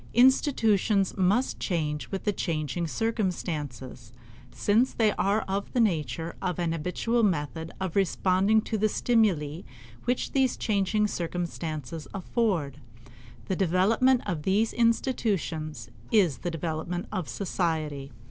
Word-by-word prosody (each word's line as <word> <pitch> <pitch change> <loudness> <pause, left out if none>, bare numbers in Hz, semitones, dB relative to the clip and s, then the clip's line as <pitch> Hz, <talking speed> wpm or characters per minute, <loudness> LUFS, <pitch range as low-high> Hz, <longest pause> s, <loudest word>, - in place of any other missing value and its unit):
Institutions 225 -6 +3
must 200 +7 +1
change 150 -5 -2
with 195 +1 -2
changing 165 0 -2
circumstances, 155 - -3 0.4
since 225 +6 +2
they 220 -2 +3
are 205 +2 +1
of 195 +1 -3
the 250 - +1
nature 165 - 0
of 180 - -1
an 170 -2 0
habitual 180 +9 0
method 160 -4 -1
of 190 -3 -3
responding 195 +2 +3
to 220 0 -3
the 215 +1 +3
stimuli 185 -11 +1 0.4
which 245 +1 0
these 265 -2 +2
changing 210 0 +1
circumstances 165 -5 -4
afford. 180 - -1 0.7
The 190 - -1
development 205 +8 +3
of 175 -7 -2
these 200 +7 +1
institutions 190 - 0 0.2
is 190 -10 +3
the 175 - -3
development 165 +2 -3
of 185 -7 -3
society. 155 -7 -2
185 Hz, 120 wpm, -27 LUFS, 160-215 Hz, 0.7 s, Institutions